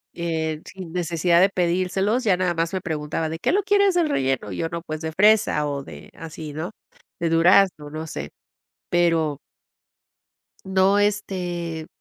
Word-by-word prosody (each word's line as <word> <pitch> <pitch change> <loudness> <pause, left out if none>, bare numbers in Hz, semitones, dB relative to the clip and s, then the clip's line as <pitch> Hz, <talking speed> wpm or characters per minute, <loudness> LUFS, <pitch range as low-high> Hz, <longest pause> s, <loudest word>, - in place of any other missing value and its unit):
eh, 160 -2 -2
sin 185 -3 -9
necesidad 170 0 +2
de 195 - +5
pedírselos, 185 +6 0
ya 195 -5 +3
nada 180 -1 0
más 165 +2 -1
me 190 - -2
preguntaba: 160 -1 -3
"¿De 160 - -4
qué - - 0
lo 405 - +3
quieres 400 -2 +3
el 335 -3 +2
relleno?". 135 - -1
Y 90 - -5
yo: - - -1
"No, 170 0 -5
pues, 155 -2 -6
de 160 -1 -3
fresa", 195 -5 +3
o 140 -1 -4
de - - -12
así, 160 -2 -8
¿no? 160 +6 -5 0.5
De 170 - +1
durazno, 165 -2 +4
no 155 +1 -6
sé. 75 - -6 0.6
Pero 165 -4 +1 1.3
No, 190 +1 +3
este, 175 -5 -2
170 Hz, 165 wpm, -23 LUFS, 160-190 Hz, 1.3 s, de